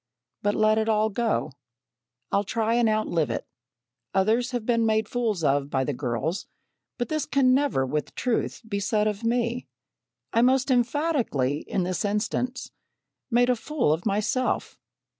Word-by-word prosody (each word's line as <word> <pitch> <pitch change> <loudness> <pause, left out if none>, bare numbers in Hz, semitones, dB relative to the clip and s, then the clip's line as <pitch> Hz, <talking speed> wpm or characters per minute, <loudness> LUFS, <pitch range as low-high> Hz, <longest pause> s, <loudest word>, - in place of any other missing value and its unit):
But 205 0 +1
let 215 0 +3
it 220 0 0
all 215 0 +2
go. 225 -7 0 0.8
I'll 200 - +2
try 225 +2 0
and 235 -1 +3
outlive 175 - 0
it. 115 - -3 0.7
Others 220 +6 +2
have 245 -3 -3
been 230 -1 +2
made 220 -1 +2
fools 220 -8 -1
of 140 -1 +2
by 130 -2 0
the 145 - -2
girls; 135 - -2 0.5
but 240 - -2
this 310 -1 -1
can 260 -2 +3
never 270 - +2
with 150 +3 -3
truth 245 0 -1
be 200 -2 -2
said 210 +1 +1
of 210 0 -3
me. 235 - 0 0.7
I 230 - +4
most 260 +2 +3
emphatically 245 - +1
in 190 - 0
this 180 0 -2
instance 230 +5 -2 0.6
made 245 +1 +4
a - - +2
fool 255 - 0
of 165 +6 -3
myself. 215 +5 0
220 Hz, 160 wpm, -26 LUFS, 190-245 Hz, 0.8 s, I